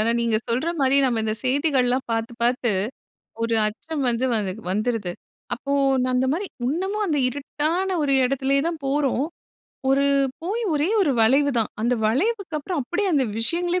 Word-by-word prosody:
ஆனா 220 Hz, +2 st, +2 dB
நீங்க 230 Hz, -2 st, +1 dB
சொல்ற 250 Hz, +8 st, 0 dB
மாரி 270 Hz, 0 st, +3 dB
நம்ம 240 Hz, -4 st, +1 dB
இந்த 215 Hz, -, 0 dB
செய்திகள்லாம் 260 Hz, -2 st, +1 dB
பார்த்து, 225 Hz, +1 st, -2 dB
பார்த்து 240 Hz, 0 st, +2 dB, 0.7 s
ஒரு 230 Hz, 0 st, +1 dB
அச்சம் 285 Hz, +7 st, -4 dB
வந்து, 240 Hz, +2 st, 0 dB
வந் 210 Hz, -4 st, 0 dB, 0.2 s
வந்துருது. 210 Hz, -2 st, -1 dB, 0.4 s
அப்போ 275 Hz, +3 st, -5 dB, 0.4 s
அந்தமாரி 260 Hz, +9 st, 0 dB, 0.2 s
இன்னமும் 385 Hz, +9 st, -1 dB
அந்த 310 Hz, -6 st, 0 dB
இருட்டான 310 Hz, +8 st, -1 dB
ஒரு 280 Hz, -2 st, +1 dB
இடத்திலேயே 275 Hz, +1 st, +1 dB
தான் 330 Hz, -3 st, -4 dB
போறோம். 275 Hz, -1 st, +1 dB, 0.7 s
ஒரு, 275 Hz, +1 st, +3 dB, 0.4 s
போயி 420 Hz, +7 st, -2 dB
ஒரே 295 Hz, +3 st, +1 dB
1 350 Hz, -7 st, +3 dB
வளைவு 275 Hz, +6 st, +4 dB
தான். 225 Hz, -, 0 dB
அந்த 240 Hz, +3 st, +2 dB
வளைவுக்கு 350 Hz, -, 0 dB
அப்புறம் 310 Hz, +2 st, -3 dB
அப்படியே 360 Hz, +10 st, -1 dB
அந்த 275 Hz, -3 st, +3 dB
விஷயங்களே 345 Hz, +9 st, +1 dB
275 Hz, 150 wpm, -23 LUFS, 240-320 Hz, 0.7 s, வளைவு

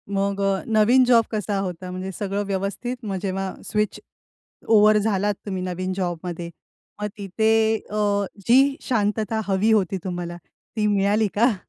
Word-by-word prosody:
मग 200 Hz, 0 st, 0 dB
अ, 195 Hz, -1 st, +1 dB
नवीन 225 Hz, +4 st, +5 dB
जॉब 235 Hz, -2 st, +5 dB
कसा 210 Hz, -2 st, -2 dB
होता? 180 Hz, -1 st, -4 dB
म्हणजे 185 Hz, +1 st, -5 dB
सगळं 200 Hz, 0 st, -1 dB
व्यवस्थित? 200 Hz, +6 st, -3 dB
मग 200 Hz, -2 st, -3 dB
जेव्हा 195 Hz, -1 st, -2 dB
स्विच 210 Hz, -1 st, -1 dB, 0.7 s
ओव्हर 215 Hz, -1 st, +6 dB
झालात 205 Hz, -1 st, +1 dB
तुम्ही 190 Hz, -2 st, -3 dB
नवीन 185 Hz, +1 st, -3 dB
जॉबमध्ये 175 Hz, -2 st, -4 dB, 0.5 s
मग 210 Hz, -, 0 dB
तिथे 210 Hz, +3 st, 0 dB, 0.4 s
अ, 205 Hz, -1 st, +1 dB, 0.2 s
जी 270 Hz, +3 st, +5 dB
शांतता 220 Hz, -2 st, 0 dB
हवी 200 Hz, +3 st, +2 dB
होती 195 Hz, -3 st, +2 dB
तुम्हाला 175 Hz, -2 st, -4 dB, 0.4 s
ती 210 Hz, -1 st, +1 dB
मिळाली 205 Hz, +1 st, +2 dB
का? 230 Hz, 0 st, +3 dB
200 Hz, 145 wpm, -23 LUFS, 190-215 Hz, 0.7 s, ओव्हर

